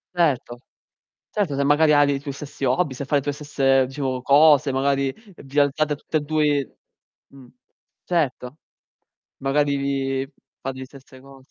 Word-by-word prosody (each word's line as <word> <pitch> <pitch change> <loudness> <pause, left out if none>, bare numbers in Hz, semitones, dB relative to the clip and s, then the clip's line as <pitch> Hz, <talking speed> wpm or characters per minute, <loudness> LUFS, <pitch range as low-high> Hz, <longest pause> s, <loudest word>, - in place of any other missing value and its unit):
Certo. 130 -8 0 0.7
Certo 185 -10 -1
se 140 - 0
magari 150 +2 +4
ha 145 0 +6
dei 140 -1 +1
tuoi 140 0 -6
stessi 140 0 -6
hobby, 130 +1 0
se 140 - -5
fa 145 - -7
le 140 - +3
tue 145 +1 -2
stesse, 135 -2 +1
diciamo, 130 -1 -4
cose, 145 -1 +5
magari 135 0 0 0.2
vi 140 +1 -2
alzate 145 +1 +1
tutte 155 - -3
e - - +1
due 150 -2 0 0.5
Mh. 135 -2 -16 0.6
Certo. 145 -5 -2 0.8
Magari 140 +1 +1
vi 135 0 -2 0.3
fate 135 0 -5
li 130 - -6
stesse 130 -1 -16
cose. 135 -1 -17
140 Hz, 155 wpm, -22 LUFS, 135-145 Hz, 0.8 s, ha